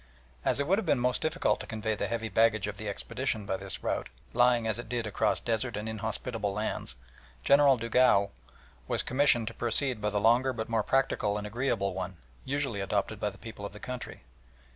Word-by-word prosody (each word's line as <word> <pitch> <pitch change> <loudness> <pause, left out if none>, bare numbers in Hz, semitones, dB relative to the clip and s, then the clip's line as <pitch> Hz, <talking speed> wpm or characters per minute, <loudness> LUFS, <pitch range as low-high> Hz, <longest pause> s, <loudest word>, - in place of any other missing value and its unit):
As - - +2
it 140 - +1
would 195 +7 +3
have 220 - -4
been 145 - +4
most 125 0 0
difficult 160 +3 +1
to - - -7
convey 110 -1 -2
the 105 - -2
heavy 115 -1 -2
baggage 110 -2 +3
of 105 -1 -5
the 110 -1 -4
expedition 110 +1 -3
by 95 - -1
this 95 0 -3
route, - - -1 0.2
lying 120 -1 +4
as 110 0 0
it 120 - -7
did 120 -2 -1
across 105 +1 +1
desert 115 -1 -1
and 105 +1 -4
inhospitable 110 -1 -2
lands, 105 - -3 0.5
General 140 -1 +6
Dugua 115 -3 +3 0.6
was - - +1
commissioned 130 -3 +3
to - - -10
proceed 120 0 0
by 105 - +1
the 105 0 0
longer 120 +5 +4
but 110 -1 -4
more 115 -1 +2
practical 105 -4 +1
and 105 - -4
agreeable 105 -3 -1
one, 95 -1 -5 0.3
usually 135 -6 -1
adopted 95 - -1
by - - 0
the - - -14
people 110 -3 -9
of 100 - -5
the 105 - -10
country. 125 - -7
115 Hz, 205 wpm, -30 LUFS, 105-125 Hz, 0.6 s, General